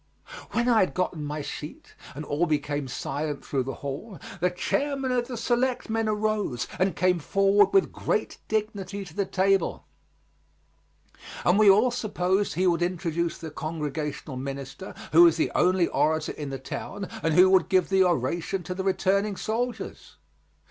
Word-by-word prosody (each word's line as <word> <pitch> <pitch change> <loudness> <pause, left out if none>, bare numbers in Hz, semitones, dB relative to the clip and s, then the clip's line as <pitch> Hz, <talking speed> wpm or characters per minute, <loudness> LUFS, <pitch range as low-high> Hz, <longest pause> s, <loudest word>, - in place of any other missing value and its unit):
When 240 +1 +1
I 235 -3 +5
had 185 - +1
gotten 180 -4 -1
my 150 0 -4
seat 150 +2 -8 0.2
and 150 +2 -6
all 150 +5 0
became 145 -2 -1
silent 145 +3 -4
through 135 - -1
the 135 +1 -4
hall, 160 +7 -6 0.2
the 180 +2 +2
chairman 270 +8 -1
of 245 -1 0
the 250 -2 -5
Selectmen 240 -2 0
arose 210 - -1
and 185 +1 +1
came 180 -1 +2
forward 195 +5 +3
with 390 -1 +3
great - - -2
dignity 200 -2 -3
to 170 - -12
the 200 +2 -1
table, 195 -1 +1 1.6
and 180 +4 +4
we 215 -2 +7
all 215 +6 +5
supposed 205 -4 0
he 185 - +1
would 175 -2 +2
introduce 170 -1 -1
the 160 -2 -8
Congregational 150 -2 -4
minister, 135 +6 -6 0.2
who 165 - +7
was 170 -2 +7
the 160 - 0
only 180 -1 +3
orator 155 0 +1
in 145 -2 -6
the 135 - -4
town, 195 +8 -6
and 160 -1 +1
who 180 +1 +8
would 190 -3 +4
give 185 -2 +3
the 190 -1 +4
oration 175 +3 0
to 180 - -4
the 190 +1 -4
returning 195 +2 +1
soldiers. 235 +5 -4
180 Hz, 160 wpm, -26 LUFS, 155-205 Hz, 1.6 s, who